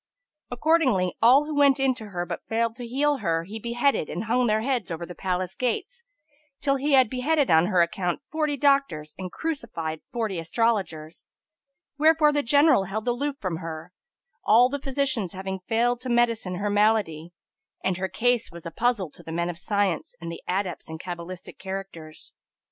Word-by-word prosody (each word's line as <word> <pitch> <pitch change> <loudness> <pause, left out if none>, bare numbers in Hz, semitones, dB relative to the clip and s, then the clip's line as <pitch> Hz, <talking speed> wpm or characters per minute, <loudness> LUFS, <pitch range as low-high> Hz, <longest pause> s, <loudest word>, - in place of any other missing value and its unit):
Accordingly, 245 - +2
all 260 +6 +6
who 305 - -4
went 280 -2 +4
in 270 -1 +3
to 225 -4 -10
her, 175 -3 -4
but - - -6
failed 230 0 0
to 245 -2 -6
heal 285 +4 +1
her, 165 -8 0
he 210 +6 -7
beheaded 240 - 0
and 175 - -3
hung 240 +2 +1
their 215 0 +2
heads 245 -4 -1
over 170 0 -4
the 180 - -9
palace 185 0 -2
gates, 475 - -3 0.6
till 275 -1 +1
he 285 +2 0
had 260 -2 +6
beheaded 270 - +1
on 160 +2 +5
her 185 -4 +4
account 175 +1 -2
forty 305 -2 0
doctors 275 - +1
and 185 -1 -5
crucified 170 - -4
forty 220 -7 -2
astrologers; 170 -4 -1 0.7
wherefor 310 0 +5
the 290 - +2
general 285 -4 +4
held 215 +5 -4
aloof 275 +4 -1
from 185 -5 -3
her, 165 +1 -7 0.5
all 240 +3 +6
the 285 +1 -3
physicians 265 - -1
having 190 0 -5
failed 240 +2 +1
to 255 - -5
medicine 230 -6 +1
her 205 +3 -2
malady; 205 -6 +1 0.5
and 190 -2 0
her 190 0 -2
case 235 +5 +1
was 170 -1 -11
a 170 - -5
puzzle 210 -3 0
to - - -15
the 160 - -9
men 170 +1 -1
of 170 - -12
science 205 - -1
and 170 0 -6
the 170 - -8
adepts 185 -3 -2
in 160 - -6
cabalistic 175 +1 -8
characters. 190 -5 -8
220 Hz, 180 wpm, -25 LUFS, 180-260 Hz, 0.7 s, all